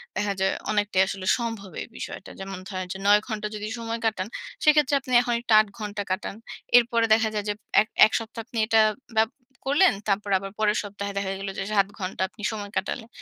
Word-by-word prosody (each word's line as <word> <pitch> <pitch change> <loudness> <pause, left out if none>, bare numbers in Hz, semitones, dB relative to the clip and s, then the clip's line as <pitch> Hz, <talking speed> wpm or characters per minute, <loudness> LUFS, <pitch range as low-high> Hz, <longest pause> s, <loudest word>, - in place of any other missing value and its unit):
দেখা 205 -1 0
যায় 190 0 +2 0.2
অনেকটাই 205 -2 +2
আসলে 195 -1 -5
সম্ভব 225 -5 -5
এই - - -6
বিষয়টা। - - -7
যেমন 195 -1 -6
ধরেন 185 -2 -4
যে - - -7
৯ 210 +1 +6
ঘন্টা 215 -2 -3
যদি 210 0 -4
সময় 230 0 -3
কাটান, 205 -3 0 0.4
সেক্ষেত্রে 300 -2 +5
আপনি 255 -1 -5
এখন 240 -1 -1
একটু 240 - -6
৮ 215 - +3
ঘণ্টা 205 -1 -4
কাটান। 190 +1 -2 0.4
এরপরে 235 -1 +3
দেখা 220 0 +3
যায় 210 -1 -2
যে - - +1 0.3
এক 215 - -2 0.2
১ 220 - 0
সপ্তাহ 225 0 -7
আপনি 240 - -8 0.6
বাপ 220 0 +4 0.4
করলেন। 290 +7 +5
তারপর 205 0 0
আবার 195 +1 -6
পরের 210 0 +2
সপ্তাহে 200 0 -5
দেখা 195 -1 -1
গেল 195 0 -4
যে - - -1
৭ 200 -1 +4
ঘন্টা 185 0 -4
আপনি 215 - -13
সময় 205 -2 -6
কাটালেন। 220 +4 -3
210 Hz, 200 wpm, -25 LUFS, 195-230 Hz, 0.6 s, ৯